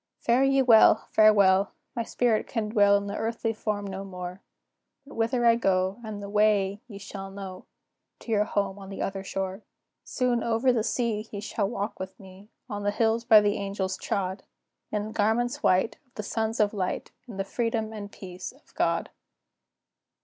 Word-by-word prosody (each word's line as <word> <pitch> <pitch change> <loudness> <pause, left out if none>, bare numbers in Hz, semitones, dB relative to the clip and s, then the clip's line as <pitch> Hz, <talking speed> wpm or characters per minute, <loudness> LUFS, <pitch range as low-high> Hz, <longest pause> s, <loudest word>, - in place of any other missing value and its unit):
Fare 240 +3 +2
ye 270 0 +4
well! 230 -3 +6
farewell! 200 -2 +5 0.2
My 235 - -1
spirit 230 -1 0
can 220 -3 -2
dwell 205 -2 +5
In 200 - -4
the 200 0 -4
earthly 225 0 -2
form 210 -2 -3
no 195 0 -5
more; 180 -1 -7 0.6
But 280 - -13
whither 235 +2 0
I 230 - +7
go, 190 -2 +1
and 210 -2 -6
the - - -5
way, 205 -1 +2
ye 205 -5 -9
shall 195 -1 -8
know, 195 -1 -8 0.6
To 230 - -7
your 210 -1 +3
home 200 -2 -1
on 195 -1 -10
the 195 - -4
other 195 0 -3
shore. 190 +1 -4 0.4
Soon 250 -2 0
"over 235 +3 +2
the 230 - +1
sea" 225 -3 -1
ye 205 - -5
shall 205 -1 -2
walk 210 -2 -4
with 190 0 -7
me, 190 +1 -14 0.2
On 205 -4 -5
the 205 - +1
hills 225 +2 +1
by 225 -3 +7
the 205 0 +1
angels 195 -1 -2
trod, 190 0 -2 0.5
In 210 -1 -1
the 215 - -7
garments 225 +3 +1
white, 185 +4 +2
of 250 - -38
the 210 - -4
sons 220 +2 -2
of 210 -1 +3
light, 185 -3 -3 0.2
In 220 -5 -9
the 195 - 0
freedom 225 +1 -2
and 205 -1 -7
peace 180 -2 -8
of 275 - -25
God. - - 0
210 Hz, 185 wpm, -27 LUFS, 195-225 Hz, 0.6 s, I